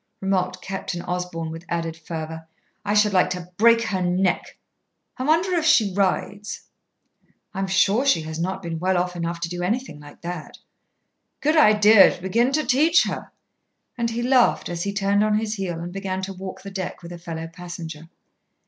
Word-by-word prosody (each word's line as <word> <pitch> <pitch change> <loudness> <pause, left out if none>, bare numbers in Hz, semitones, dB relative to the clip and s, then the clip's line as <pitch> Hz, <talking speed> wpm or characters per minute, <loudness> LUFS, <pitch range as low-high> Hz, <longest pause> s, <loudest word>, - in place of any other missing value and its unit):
remarked 185 -1 -1
Captain 190 -2 -4
Osborn 175 -2 -4
with 165 +1 -8
added 165 -1 -2
fervour. 160 0 -7 0.4
"I 205 0 0
should 210 -1 +4
like 185 - +4
to 180 -1 -5
break 230 +1 +5
her 190 -4 -2
neck! 180 +1 0 0.6
I - - -6
wonder 330 +6 +2
if 340 -3 +1
she 225 - +4
rides?" 200 +1 -1 0.9
"I'm 195 -1 -2
sure 195 +5 +3
she 275 -13 +3
has 160 +1 -6
not 190 +3 -3
been 165 -1 -4
well 185 +2 +1
enough 175 -1 -1
off - - -12
to 170 - -1
do 175 0 -5
anything 200 - -2
like 145 0 -14
that." 170 -2 -6 0.8
"Good 305 +2 +2
idea 210 -7 +7
to - - -13
begin 230 +8 +1
to 310 +1 +1
teach 310 +6 +4
her." - - -5 0.6
And 235 -1 -1
he 235 +1 -3
laughed 255 -1 +3
as 170 -1 -4
he 200 - -1
turned 200 +1 +2
on 215 0 +2
his 215 0 -2
heel 185 -5 -3
and 175 +1 -6
began 190 -1 -3
to 195 +1 -4
walk 190 0 -8
the 200 - -8
deck 190 -2 -5
with 170 - -9
a 175 - -8
fellow 165 -1 -6
passenger. 165 -2 -8
190 Hz, 185 wpm, -23 LUFS, 170-210 Hz, 0.9 s, idea